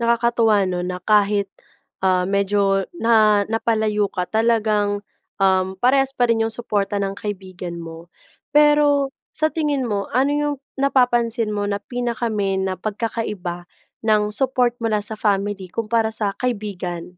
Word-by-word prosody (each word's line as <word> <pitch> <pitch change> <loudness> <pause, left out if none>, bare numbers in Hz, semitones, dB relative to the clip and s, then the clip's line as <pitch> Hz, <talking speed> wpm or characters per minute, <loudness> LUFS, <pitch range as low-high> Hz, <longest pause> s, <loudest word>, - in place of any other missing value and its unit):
Nakakatuwa 235 -1 +2
'no 180 -1 -2
na 180 - -4
kahit, 205 -1 +3 0.6
ah, 185 -1 +3
medyo 200 +1 +2 0.4
na 230 0 +4 0.4
napalayo 220 -2 +1
ka, 180 - -1
talagang, 220 -2 +2 0.5
um, 190 -1 +3 0.2
parehas 270 +2 +3
pa 245 - +4
rin 225 -1 +2
yung 225 - -1
suporta 205 -3 -1
ng 195 0 -2
kaibigan 185 -4 -6
mo. 165 0 -8 0.6
Pero 295 0 +6 0.5
sa 310 - +4
tingin 295 -4 0
mo, 205 -1 0 0.2
ano 275 +2 +3
yung 295 -1 -1 0.3
napapansin 240 -4 +2
mo 205 - -1
na 200 - -1
pinaka-main 230 -5 -1
na 190 - -1
pagkakaiba 210 -5 -3 0.5
ng 215 -1 +4 0.2
support 255 -2 +2
mula 215 -2 +1
sa 220 - -4
family 200 -1 0
kumpara 225 0 +1
sa 210 - 0
kaibigan? 200 -8 -3
215 Hz, 135 wpm, -21 LUFS, 200-235 Hz, 0.6 s, Pero